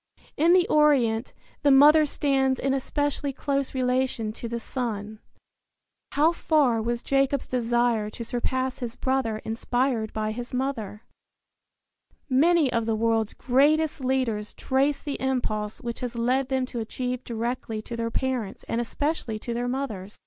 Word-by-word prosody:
In 330 +4 +4
the 365 -1 +4
Orient 260 -7 +3 0.3
the 290 - +3
mother 300 +3 +7
stands 270 -2 +1
in 270 0 0
especially 285 +1 -1
close 275 0 -2
relation 250 -3 0
to 235 - -6
the 235 0 -3
son. 220 -4 -4 0.9
How 310 +3 +4
far 290 -9 +2
was 235 +1 -2
Jacob's 275 0 +1
desire 240 -3 +1
to 235 - -7
surpass 255 +2 -2
his 240 -3 -5
brother 260 -5 -1
inspired 235 0 -1
by 215 0 -2
his 245 +3 -6
mother? 235 -5 -3 1.2
Many 300 +1 +3
of 230 -1 0
the 225 - +1
world's 225 -1 0
greatest 290 +3 +2
leaders 250 -5 -1
trace 275 +2 +1
the 285 -2 -5
impulse 220 -5 -2
which 235 -1 -5
has 245 -1 -4
led 250 +3 +1
them 260 -1 +1
to 245 -2 -6
achieve 250 +3 -3
directly 230 -1 -3
to 235 - -6
their 230 0 -2
parents 250 -4 -2
and 235 - -1
especially 250 -2 -2
to 235 +2 -5
their 240 +1 -2
mothers. 220 -7 -4
250 Hz, 150 wpm, -26 LUFS, 230-275 Hz, 1.2 s, mother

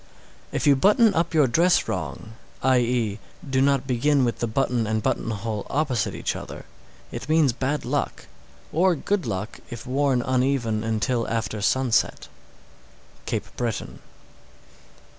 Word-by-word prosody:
_ - - -27 0.5
627. - - -10
If - - -1
you 145 - +6
button 210 - +4
up 170 +1 0
your 150 -3 +6
dress 170 +8 +3
wrong, 110 - -4 0.3
i.e., 120 -4 +2 0.3
do 130 -1 +1
not 140 -1 +2
begin 135 +2 +2
with 120 - -2
the 120 - 0
button 120 -1 0
and 110 0 -1
button - - -1
hole 110 -1 -4
opposite 135 -7 0
each - - -2
other, - - -8 0.5
it 135 - -7
means 155 -5 +4
bad 135 +4 -2
luck, - - -2 0.5
or 180 +2 +3
good 185 +1 -1
luck 100 +1 -4
if 120 -1 -8
worn 130 -1 +1
uneven 125 -4 0
until 115 +2 0
after 115 -2 -2
sunset. 130 +2 +1 1.0
_Cape - - -3
Breton. 120 -4 -3
125 Hz, 145 wpm, -24 LUFS, 115-140 Hz, 1.0 s, you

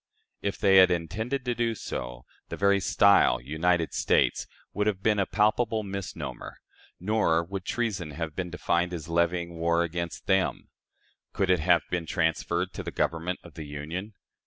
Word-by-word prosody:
If 100 -1 -2
they 95 -1 +5
had 95 -1 +8
intended 110 - -2
to 125 - 0
do 115 -1 -1
so, - - -6 0.2
the - - -5
very 100 0 +3
style, 100 - +4
"United 80 +5 0
States," - - +1 0.3
would 105 0 0
have 95 -3 -1
been 105 -2 +2
a 95 - +1
palpable 110 +2 +1
misnomer, 100 -1 -6 0.4
nor 90 -4 +2
would 95 +1 -6
treason 105 -9 -2
have 80 +1 -5
been 90 -1 -3
defined 85 +1 0
as 80 -2 -6
levying 85 0 0
war 85 +1 +2
against 85 0 -4
them. 95 -1 0 0.6
Could 95 -1 +1
it 90 - +3
have 85 -1 +3
been 85 -2 -2
transferred 85 +3 0
to - - -5
the - - -5
Government 85 +2 -2
of 85 - -13
the 75 0 -8
Union? 80 +9 -6
90 Hz, 165 wpm, -27 LUFS, 85-100 Hz, 0.6 s, had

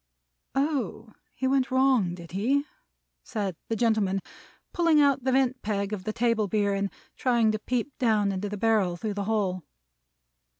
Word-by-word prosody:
"Oh! 260 - -1 0.2
he 265 - -3
went 265 -1 +2
wrong, 260 -9 +3
did 170 -2 -11
he?" 255 +10 +1 0.6
said 200 -6 -3
the 225 - -1
gentleman, 215 -4 +1 0.5
pulling 335 -3 +4
out 280 -3 +3
the 260 - +2
vent 260 -1 +2
peg 205 -1 -2
of 195 -2 -5
the 215 - -1
table 230 -2 +1
beer, 205 0 +1
and 195 0 -1 0.3
trying 235 -4 +3
to 215 - -2
peep 250 +4 -2
down 215 -5 +2
into 195 +2 -3
the 210 - -4
barrel 205 -5 +2
through 210 +4 -3
the 200 0 -3
hole. 195 -4 0
220 Hz, 165 wpm, -27 LUFS, 200-255 Hz, 0.6 s, pulling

